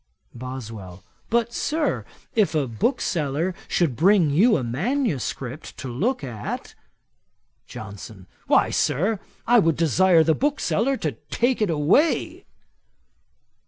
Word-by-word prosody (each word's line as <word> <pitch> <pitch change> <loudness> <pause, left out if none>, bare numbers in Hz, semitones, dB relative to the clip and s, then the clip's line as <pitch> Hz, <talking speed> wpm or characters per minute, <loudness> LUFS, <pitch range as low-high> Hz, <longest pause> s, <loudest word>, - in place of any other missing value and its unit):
BOSWELL. 115 -7 -8 0.3
'But, 235 0 +1
Sir, 310 +3 -1 0.3
if 210 -7 +2
a 145 -4 +1
bookseller 155 - -1
should 160 -8 +1
bring 175 - +4
you 215 +10 +4
a - - -3
manuscript 145 - -3
to 135 - -6
look 190 - -1
at?' 115 -6 -6 0.9
JOHNSON. 100 -1 -9 0.2
'Why, - - +3
Sir, 195 - +1 0.3
I 240 0 +5
would 165 -6 +2
desire 170 +2 +4
the 160 - +3
bookseller 275 - 0
to 155 - -2 0.2
take 245 0 +1
it 210 - +2
away.' 165 - +1
165 Hz, 115 wpm, -23 LUFS, -, 0.9 s, I